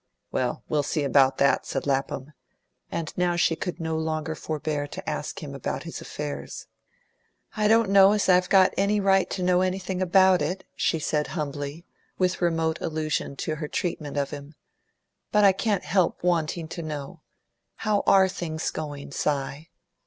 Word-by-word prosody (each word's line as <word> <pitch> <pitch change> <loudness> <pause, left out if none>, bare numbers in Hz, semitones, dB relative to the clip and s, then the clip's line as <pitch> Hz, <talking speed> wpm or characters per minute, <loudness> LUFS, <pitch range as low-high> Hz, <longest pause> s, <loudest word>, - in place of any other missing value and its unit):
"Well, 125 -1 -1
we'll 150 - +1
see 145 +1 -1
about 135 -1 +4
that," 140 - +2
said 135 - -3
Lapham; 135 +1 -2 0.6
and 160 -3 -3
now 180 -1 +1
she 170 -1 +2
could 180 +2 -5
no 160 -1 -2
longer 160 0 -2
forbear 150 -2 -3
to - - -9
ask - - -4
him - - -7
about - - -4
his - - -7
affairs. 70 -1 -6 0.9
"I 210 -1 +2
don't 225 0 +4
know 195 0 +7
as 210 - +1
I've 180 -1 +4
got 190 -2 +5
any 200 +2 +2
right 195 -1 +3
to 185 - -3
know 180 0 +3
anything 185 0 -2
about 185 0 +5
it," 180 +6 -2
she 165 - +1
said 150 -1 -1
humbly, 145 +2 -4 0.3
with 185 0 0
remote 165 -2 0
allusion 155 -3 -2
to 155 -1 -2
her 150 -1 -4
treatment 155 -5 -3
of 140 -1 -1
him. 145 +2 -9 0.8
"But 210 0 +4
I 200 - +8
can't 200 -1 -1
help 175 +2 +1
wanting 170 -2 0
to 170 - -5
know. 155 +1 -6 0.5
How 215 -2 0
ARE 190 -1 +6
things 170 -4 -3
going, 145 -3 -6
Si?" 140 +2 -2
160 Hz, 165 wpm, -26 LUFS, 150-185 Hz, 0.9 s, I